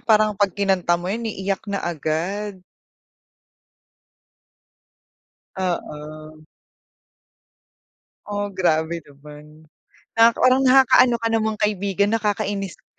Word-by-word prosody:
parang 215 -1 +3
'pag 200 -2 -1
kinanta 190 -4 +1
mo 175 - -9
'yan 230 +1 -3
iiyak 195 0 -4
na 200 -1 -3
agad. 180 +5 -3 2.9
Oo. 155 -3 -5 1.8
Oh, 205 -1 -3
grabe 170 -2 0
naman 150 +1 -15 0.5
nakaka 230 0 +5
parang 255 +1 +5
nakakaano 255 -1 +5
ka - - +2
namang 220 -1 0
kaibigan, 200 0 0
nakakainis 205 -3 -2
ka. - - -35
195 Hz, 90 wpm, -22 LUFS, 165-215 Hz, 2.9 s, nakaka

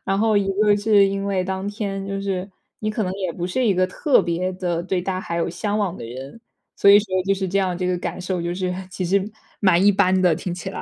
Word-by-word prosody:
然 195 - 0
后 215 +1 +2
一 200 -1 +2 0.2
个 205 -1 +4
是 205 -1 +4
因 195 0 -3
为 195 -2 0
当 190 +1 -3
天 200 -2 -4
就 195 0 -3
是 190 -1 -3 0.3
你 215 - -3
可 215 +1 -1
能 185 -1 -2
也 185 -3 -3
不 170 - -5
是 215 +8 -1
一 200 - +3
个 185 +1 +3
特 250 +9 +2
别 175 +2 -1
地 180 -2 -2
对 185 -1 -1
大 185 0 -2
海 170 -2 -4
有 170 - -1
向 205 +4 -2
往 195 -4 -1
的 - - -8
人， 130 - -9 0.4
所 - - +4
以 200 +1 +9
说 215 - -8 0.2
就 195 - +3
是 190 -1 -3
这 195 - 0
样， 185 -2 0
这 180 - -3
个 180 -1 0
感 185 - -5
受 180 -1 -2
就 170 +1 -2
是 185 -1 -2 0.2
其 185 - -3
实 195 +3 +1 0.3
蛮 185 -2 +4
一 205 - +7
般 190 -1 +2
的 170 -4 +4
听 175 0 -4
起 180 +2 -6
来， - - -6
190 Hz, 290 characters per minute, -22 LUFS, 180-200 Hz, 0.4 s, 以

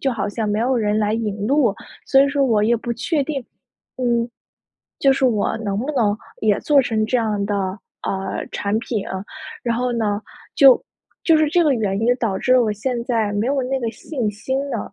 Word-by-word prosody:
就 270 -2 0
好 205 -3 -2
像 215 +1 -2
没 210 +1 0
有 250 +3 +1
人 210 -2 +1
来 210 0 +1
引 210 -2 -2
路， 260 -5 +3 0.3
所 270 - +5
以 280 - +2
说 280 0 +1
我 220 -5 +2
也 235 +2 +3
不 235 +1 -4
确 295 +5 -1
定， 275 -2 -3 0.5
嗯， 240 -2 0 0.7
就 275 - +5
是 265 - 0
我 225 -3 +1
能 205 -3 -2
不 265 +6 -2
能 215 -7 +1 0.2
也 210 -2 +2
做 290 -2 +4
成 220 -3 0
这 255 - +1
样 210 -3 -1
的， 205 0 -1 0.5
呃， 190 0 -3
产 205 +2 -1
品。 225 -4 -3 0.6
然 235 -1 0
后 250 +1 0
呢， 215 -3 -1 0.3
就 270 -3 +7 0.4
就 325 - +5
是 310 -1 +3
这 345 +3 +3
个 290 -3 +3
原 205 -4 -1
因 240 +2 +3
导 215 -6 -1
致 255 - +1
了 250 - +5
我 215 - 0
现 235 +3 -2
在 225 -4 0
没 205 +2 0
有 275 0 +1
那 265 +1 -1
个 230 -2 -1
信 245 -3 -3
心 235 +6 -3
了， - - -4
230 Hz, 225 characters per minute, -21 LUFS, 210-265 Hz, 0.7 s, 就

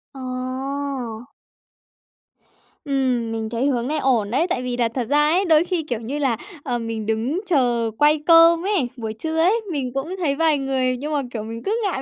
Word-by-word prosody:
Ồ. 255 -2 -5 1.5
Ừm, 255 -5 0
mình 220 -1 -3
thấy 235 +3 -1
hướng 245 -3 0
này 305 +1 -1
ổn 230 -6 +1
đấy, 325 +8 +2
tại 255 -7 -1
vì 250 -1 -3
là 235 -2 +2
thật 235 0 -4
ra 295 +1 +4
ấy, 370 +4 +2
đôi 315 -1 +5
khi, 350 -2 -2
kiểu 245 -6 -3
như 265 +6 -4
là, 255 -6 +1 0.3
ờ, 245 -3 -2
mình 225 -2 -4
đứng 225 +9 -1
chờ 240 -9 +1
quay 300 +1 +4
cơm 335 +1 +6
ấy, 380 -12 +1
buổi 220 -2 -4
trưa 320 +9 -4
ấy, 395 +8 +3
mình 265 -4 -3
cũng 290 +7 -3
thấy 295 -6 0
vài 315 -1 +3
người 260 -2 0
nhưng 300 +4 -4
mà, 290 - +1
kiểu, 215 -2 -3
mình 225 +1 -7
cứ 415 - 0
ngại 360 -9 -1
265 Hz, 200 wpm, -22 LUFS, 235-310 Hz, 1.5 s, cơm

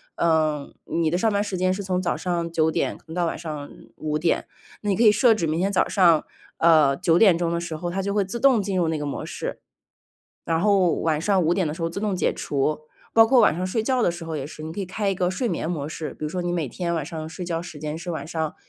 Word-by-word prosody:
呃， 155 -3 +1
你 165 -1 0
的 175 - 0
上 220 +4 +2
班 200 0 +1
时 205 -2 -3
间 185 +1 +2
是 195 - -4
从 185 -2 -1
早 175 - -1
上 170 -2 -2
9 160 -1 +2
点 - - -1
可 - - -25
能 160 - -8
到 175 -1 +1
晚 165 - -3
上 150 -3 -6 0.3
5 150 -1 -2
点。 165 +1 +1 0.4
那 210 - -2
你 195 - +1
可 235 - +3
以 215 - +8
设 225 +2 +5
置 190 -6 -1
明 155 +2 -1
天 195 +2 +1
早 190 - +2
上， 170 -5 +4 0.3
呃， 155 -5 +5
9 170 -2 +3
点 195 -6 +6
钟 170 -1 -1
的 170 - 0
时 170 -2 -5
候， 175 +2 -4
它 195 +2 -2
就 200 +1 -2
会 205 -2 +2
自 200 +5 -5
动 265 -3 +5
进 195 -1 -2
入 175 -3 +2
那 160 -1 -1
个 150 - -4
模 140 - -4
式。 - - -5 0.9
然 165 0 0
后 195 -3 +4
晚 155 -2 +1
上 190 +2 +2
5 165 +2 +3
点 180 -3 0
的 150 - -3
时 165 - -8
候 165 - 0
自 170 - -5
动 205 -2 -1
解 180 - +1
除。 145 +2 -1 0.4
包 225 0 +7
括 255 +1 +5
晚 155 - +5
上 180 +2 -2
睡 215 +4 -1
觉 255 +2 +1
的 215 - +3
时 170 0 -6
候 165 -1 -4
也 135 -1 -5
是， 155 - -10
你 160 - -5
可 205 - -6
以 - - -3
开 205 +3 -2
一 - - +1
个 180 -1 0
睡 240 +7 -1
眠 165 - -2
模 150 -5 -3
式。 155 0 -5
比 - - -10
如 - - -3
说 180 +3 -3
你 175 0 -2
每 165 -5 -1
天 170 +3 -2
晚 160 -4 -2
上 160 -1 -6
睡 170 +3 -6
觉 165 -1 -2
时 175 -3 -9
间 150 +1 -4
是 170 +2 -7
晚 160 - -4
上 160 -2 -3
170 Hz, 300 characters per minute, -24 LUFS, 160-190 Hz, 0.9 s, 以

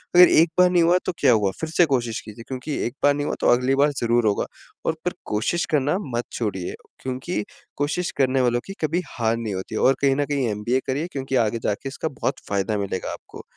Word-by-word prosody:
अगर 180 0 +9
एक 165 +1 +5
बार 180 0 +7
नहीं 175 -2 +4
हुआ, 175 +2 +5
तो - - 0
क्या 130 -4 +5
हुआ? 105 -3 +2
फिर 160 - -2
से 170 +2 +4
कोशिश 120 -6 -1
कीजिए, 110 +1 -11
क्योंकि 135 +3 -4
एक 120 - -7
बार 145 - +6
नहीं 145 0 -2
हुआ - - -1
तो - - +2
अगली 125 +2 +2
बार 145 +2 +3
ज़रूर 120 -1 +2
होगा 100 - 0 0.4
और - - +2
फिर - - 0
कोशिश 115 +12 0
करना 150 +3 +2 0.2
मत 120 - -1
छोड़िए, 95 -6 -3 0.3
क्योंकि 130 +1 -3 0.3
कोशिश 150 +5 -1
करने 130 -1 +3
वालों 120 -1 +2
की 195 - -7
कभी 165 +3 +1
हार 115 -1 0
नहीं 115 -3 -3
होती 95 +3 -5
और 135 - +4
कहीं 135 -1 +3
न 145 - +1
कहीं 140 -3 0
एमबीए 105 +5 0
करिए, 145 +6 -1
क्योंकि 135 -1 -3
आगे 115 +2 -3
जाके 105 +6 -2
इसका 145 +3 -4
बहुत - - 0
फ़ायदा 100 +1 0
मिलेगा 100 -2 -3
आपको। - - -11
130 Hz, 225 wpm, -23 LUFS, 115-145 Hz, 0.4 s, अगर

